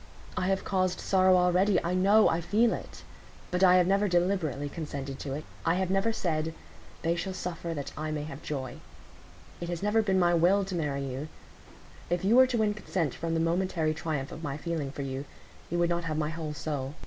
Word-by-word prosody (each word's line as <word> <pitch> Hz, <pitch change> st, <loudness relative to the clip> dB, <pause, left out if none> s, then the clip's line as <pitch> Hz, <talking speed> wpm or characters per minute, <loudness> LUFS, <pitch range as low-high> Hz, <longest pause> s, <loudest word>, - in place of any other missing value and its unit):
I 185 Hz, -, 0 dB
have 195 Hz, 0 st, +1 dB
caused 185 Hz, -2 st, 0 dB
sorrow 185 Hz, -1 st, +4 dB
already—I 180 Hz, 0 st, +3 dB
know—I 190 Hz, -2 st, +4 dB
feel 220 Hz, +7 st, +3 dB
it; -, -, -8 dB, 0.5 s
but 180 Hz, +1 st, +1 dB
I 180 Hz, -1 st, +7 dB
have 180 Hz, -1 st, +5 dB
never 200 Hz, +3 st, +2 dB
deliberately 175 Hz, -6 st, 0 dB
consented 140 Hz, -3 st, -5 dB
to 135 Hz, -, -4 dB
it; 150 Hz, +2 st, -4 dB, 0.2 s
I 165 Hz, -, +2 dB
have 185 Hz, 0 st, 0 dB
never 195 Hz, +4 st, +2 dB
said, 160 Hz, -6 st, -1 dB, 0.5 s
'They 165 Hz, +1 st, +2 dB
shall 190 Hz, +2 st, -3 dB
suffer, 170 Hz, -2 st, -4 dB
that 140 Hz, -2 st, -5 dB
I 155 Hz, +1 st, -3 dB
may 150 Hz, -1 st, -2 dB
have 150 Hz, -1 st, -8 dB
joy.' 130 Hz, -4 st, -5 dB, 0.8 s
It 170 Hz, -, -5 dB
has 175 Hz, +1 st, -4 dB
never 210 Hz, +2 st, +3 dB
been 195 Hz, -3 st, +1 dB
my 175 Hz, -1 st, +4 dB
will 185 Hz, +4 st, +4 dB
to 190 Hz, -, -6 dB
marry 145 Hz, -5 st, -1 dB
you; 135 Hz, +3 st, -4 dB, 0.8 s
if 175 Hz, +1 st, 0 dB
you 215 Hz, +4 st, +4 dB
were 260 Hz, +1 st, +8 dB
to 250 Hz, -2 st, -1 dB
win 215 Hz, -2 st, +2 dB
consent 180 Hz, -8 st, -2 dB
from 165 Hz, 0 st, -3 dB
the -, -, +1 dB
momentary 165 Hz, -1 st, +1 dB
triumph 150 Hz, -3 st, -3 dB
of 160 Hz, -, -8 dB
my 145 Hz, -3 st, -3 dB
feeling 155 Hz, -3 st, -3 dB
for 140 Hz, -, -5 dB
you, 135 Hz, +1 st, -4 dB, 0.4 s
you 175 Hz, -, -1 dB
would 175 Hz, 0 st, +2 dB
not 170 Hz, 0 st, -1 dB
have 155 Hz, -2 st, -2 dB
my 155 Hz, 0 st, 0 dB
whole 160 Hz, -2 st, -5 dB
soul. 145 Hz, -2 st, -4 dB
170 Hz, 205 wpm, -29 LUFS, 155-190 Hz, 0.8 s, were